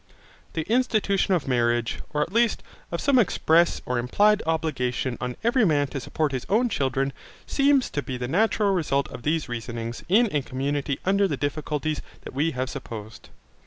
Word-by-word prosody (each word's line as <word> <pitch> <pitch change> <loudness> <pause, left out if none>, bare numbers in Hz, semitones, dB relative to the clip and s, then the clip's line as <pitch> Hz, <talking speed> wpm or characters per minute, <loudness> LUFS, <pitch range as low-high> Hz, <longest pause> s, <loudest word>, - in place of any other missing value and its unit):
The 160 - -1
institution 215 -4 +2
of 165 - -2
marriage, 120 -2 +1
or 150 0 +1
at 170 - -8
least, 230 -1 +2 0.3
of 170 - -2
some 275 -2 +4
express 170 -5 +3
or 125 -1 -1
implied 205 +13 +3
obligation 130 -6 -1
on 125 0 -3
every 235 +1 +3
man 150 -7 +3
to 135 - -4
support 150 +3 -1
his 130 -2 -3
own 240 +5 +3
children, 135 -5 0 0.3
seems 275 -2 +2
to 145 - -1
be 130 -2 -5
the 125 0 -3
natural 205 - +2
result 140 -6 0
of - - -8
these 155 +4 0
reasonings 115 -1 -5
in 225 +6 +5
a 145 - +2
community 140 +2 -2
under 200 +1 +3
the 145 -6 -2
difficulties 150 +1 -2 0.2
that - - -8
we 145 +5 +1
have 130 -3 -2
supposed. 110 -5 -8
150 Hz, 175 wpm, -25 LUFS, 130-200 Hz, 0.3 s, in